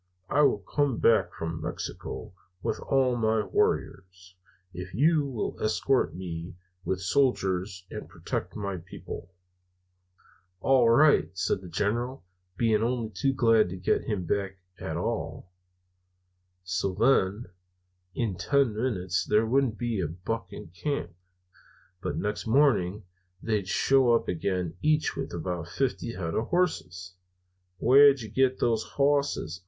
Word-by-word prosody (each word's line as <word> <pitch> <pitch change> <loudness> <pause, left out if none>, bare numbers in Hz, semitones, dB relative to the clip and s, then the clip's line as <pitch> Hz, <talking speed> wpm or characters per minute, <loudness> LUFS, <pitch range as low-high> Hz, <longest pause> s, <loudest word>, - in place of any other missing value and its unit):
I 145 - +4
will 140 - +4
come 130 +5 -1
back 115 - +3
from 80 0 -4
Mexico - - -6 0.3
with - - -1
all 130 -2 +2
my 110 -2 +1
warriors, 90 -2 -2 0.4
if 90 +1 -7
you 150 +3 +3
will 125 -6 -4
escort 125 +3 +1
me 85 -2 -6 0.3
with 95 +1 -1
soldiers 95 -5 0
and - - -7
protect - - -5
my 100 -3 -3
people.' 85 0 -9 1.3
"'All 130 0 +4
right,' 145 - +5
says 95 - 0
the 90 - -10
General, 115 +6 -2 0.3
being 110 -1 +2
only 115 -1 -1
too 135 +4 0
glad 115 -6 +3
to 95 - -6
get 90 - 0
him 100 -5 -2
back 95 +1 -2 0.2
at - - -4
all. 90 - -4 1.1
"So, 95 +1 -2
then, 110 -2 +2 0.7
in 110 -7 -1
ten 130 +4 +2
minutes 95 -6 -1
there 110 +2 +2
wouldn't 125 -1 +1
be 120 -5 -1
a 85 - -1
buck 95 +8 -4
in - - -9
camp, 95 - -3 0.9
but - - -3
next 105 +2 -3
morning 110 -7 +3 0.4
they 105 -4 0
shows 120 +4 +3
up - - -19
again, 90 -1 -2
each 155 0 +2
with 135 -1 -4
about 85 0 -4
fifty 120 +3 -2
head 85 -5 -4
of 115 - -1
hosses. 95 - -1 0.6
"'Where'd 135 +4 +6
you 110 - -7
get 130 +3 +1
those 115 -2 +2
hosses?' 140 - 0
110 Hz, 135 wpm, -28 LUFS, 90-130 Hz, 1.3 s, Where'd